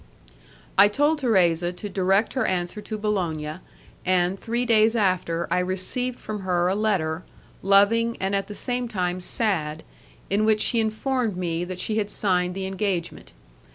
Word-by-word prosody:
I 200 - +9
told 290 +8 +1
Thérèse 180 -7 +2
to 205 - -5
direct 195 +2 +1
her 260 - 0
answer 180 +3 -2
to 215 +1 -5
Bologna, 170 -7 -2 0.5
and, 185 +1 +1
three 240 +2 -2
days 225 -1 +4
after, 185 -5 0
I - - +3
received 195 +8 -1
from 215 -1 -5
her 180 -2 0
a 185 - +1
letter 185 -6 0 0.4
loving, 210 +4 +4
and 190 +1 -1
at 195 - -1
the 205 - -8
same 245 +1 -2
time 185 -4 -2
sad, 160 -7 -1 0.4
in 205 +2 +1
which 215 -1 +3
she 235 - +2
informed 220 -1 -1
me 170 -2 -2
that 180 0 -7
she 215 +2 -1
had 205 -1 -2
signed 180 -3 +1
the 195 0 -3
engagement. 190 -3 -3
195 Hz, 160 wpm, -24 LUFS, 180-220 Hz, 0.5 s, I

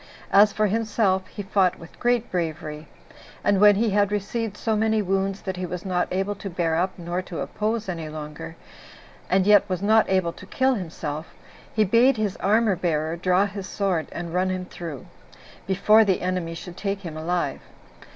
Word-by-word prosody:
As 205 +1 +6
for 215 +1 +1
himself, 205 -3 +1
he 205 - -7
fought 190 -2 +2
with 165 - -14
great 240 -1 +1
bravery; 155 -3 -3 0.6
and 200 -1 +2
when 210 -1 +8
he 220 +1 +1
had 205 0 +2
received 210 +1 -2
so 220 -1 0
many 220 0 +2
wounds, 195 0 -1
that 190 -2 -4
he 180 - -3
was 180 +1 -6
not 180 -2 0
able 190 +2 -1
to 200 - -7
bear 170 -2 0
up 185 +3 -1
nor 175 +1 -3
to 180 -2 -7
oppose 215 0 -2
any 165 -4 -4
longer, 150 - -7 0.7
and 190 0 +3
yet 205 -1 +5
was 185 +1 -2
not 220 +2 +4
able 185 -3 +1
to 185 - -13
kill 260 +4 +2
himself, 160 -6 -5 0.4
he 215 - +2
bade 235 +6 +4
his 210 -3 -1
armor 215 0 +2
bearer 160 -2 -1
draw 180 +3 +2
his 200 -1 -6
sword, 190 -7 -1
and 170 -1 -6
run 185 +1 +1
him 185 -1 -3
through, 165 -7 -8 0.6
before 210 +3 +5
the 195 -3 +1
enemy 180 -2 -2
should 175 +1 -9
take 195 0 -3
him 165 -5 -7
alive. 170 +3 -2
190 Hz, 185 wpm, -24 LUFS, 175-210 Hz, 0.7 s, when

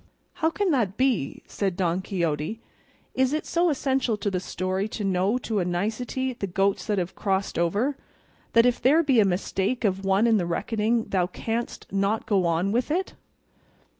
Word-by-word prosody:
"How 320 - +4
can 385 +2 0
that 220 -8 0
be?" 255 - 0
said 195 -4 -2
Don 180 0 0
Quixote; 170 +1 -2 0.5
"is 260 +1 +2
it 310 - -1
so 345 +1 +2
essential 265 -5 0
to 205 -1 -2
the 185 - 0
story 185 +2 -2
to 215 -1 -5
know 195 +4 +1
to 225 -4 -2
a - - +1
nicety 220 +9 -2
the 220 -5 -4
goats 195 +3 0
that 210 -2 0
have 180 -1 -2
crossed 195 -3 -1
over, 205 - +1 0.6
that 230 0 +6
if 245 -1 +2
there 305 +6 +5
be 270 -6 +3
a 210 - +6
mistake 195 +5 -1
of 195 -1 0
one 195 +3 +3
in 225 -2 +4
the 175 -4 -1
reckoning, 220 +6 0
thou 180 -2 +1
canst 225 +5 -4
not 200 +3 0
go 190 -4 +2
on 170 +4 +1
with 245 +5 0
it?" 365 +5 -1
205 Hz, 185 wpm, -25 LUFS, 185-245 Hz, 0.6 s, that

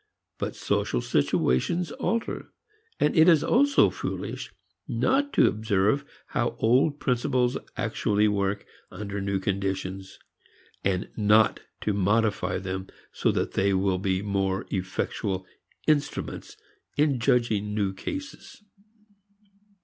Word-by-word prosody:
But - - -3
social - - 0
situations 145 - +1
alter; 230 0 -2 0.5
and 150 - +2
it 160 +2 +7
is 160 -4 +5
also 280 +3 +4
foolish - - -5 0.4
not 280 +2 +1
to - - +5
observe 110 +4 +1 0.3
how 120 -4 -1
old 130 +6 +3
principles 125 0 +1 0.2
actually 105 +1 +1
work 100 -1 0 0.2
under 100 -1 -5
new 100 0 -1
conditions, 95 0 -3 0.7
and 95 -1 0
not 105 0 +4 0.2
to 105 - 0
modify 105 +2 +1
them 95 0 -4 0.2
so - - +1
that - - -1
they 100 0 +2
will 95 -1 +1
be 95 0 0
more 95 -1 -1
effectual 95 0 -2 0.4
instruments 150 - -1 0.4
in 145 -3 +2
judging 110 -4 +1
new 100 -2 0
cases. 280 - -7
105 Hz, 110 wpm, -26 LUFS, 95-130 Hz, 0.7 s, it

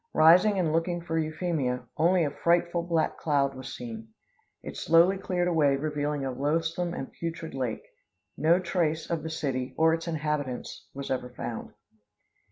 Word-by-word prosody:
Rising 180 +6 +6
and 165 -4 +1
looking 175 +1 0
for 165 -1 -2
Euphemia, 155 -6 -1
only 170 +2 +3
a 145 - 0
frightful 170 +3 +1
black 170 -2 0
cloud 140 -3 +1
was 130 0 -8
seen. 115 -2 -7 0.6
It - - -7
slowly 170 +4 +4
cleared 180 -2 -1
away 150 -5 +3
revealing 150 -1 -2
a 135 - -1
loathsome 165 +6 -1
and 135 - -6
putrid 165 -1 -5
lake. 125 -4 -3 0.5
No 165 +3 +4
trace 170 -3 -1
of 165 -2 0
the 160 - -5
city 130 -4 -3
or 160 0 +5
its 165 +1 -3
inhabitants 150 -5 -3
was 140 0 -5
ever 125 -1 -2
found. 120 -2 -6
160 Hz, 160 wpm, -28 LUFS, 140-170 Hz, 0.6 s, Rising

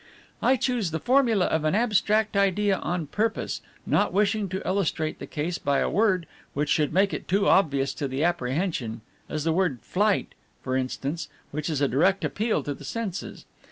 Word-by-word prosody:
"I 255 +3 +4
chose 245 -7 0
the 160 +1 -3
formula 240 - +3
of 160 -1 0
an 155 +4 +2
abstract 215 -1 +2
idea 200 0 +2
on 170 0 -2
purpose, 215 +9 -2 0.2
not - - +2
wishing 205 0 +1
to 190 +1 -4
illustrate 175 -5 -1
the - - -7
case 160 +3 -3
by 140 -1 +1
a - - +1
word 190 -4 +2 0.3
which 145 +1 0
should 150 -2 +2
make 195 +4 +3
it - - -5
too 200 +2 +2
obvious 140 -7 +3
to 140 - 0
the 135 +3 -2
apprehension, 130 - -1 0.3
as 155 - -2
the 165 0 +1
word 165 - 0
Flight 205 +2 +1 0.3
for 130 0 -1
instance, 135 +5 -2 0.2
which 150 +2 -3
is 150 -3 -1
a 140 - +4
direct 185 - +2
appeal 215 -8 0
to 145 - -3
the 145 - -12
senses. 200 +3 -5
180 Hz, 185 wpm, -26 LUFS, 150-205 Hz, 0.3 s, I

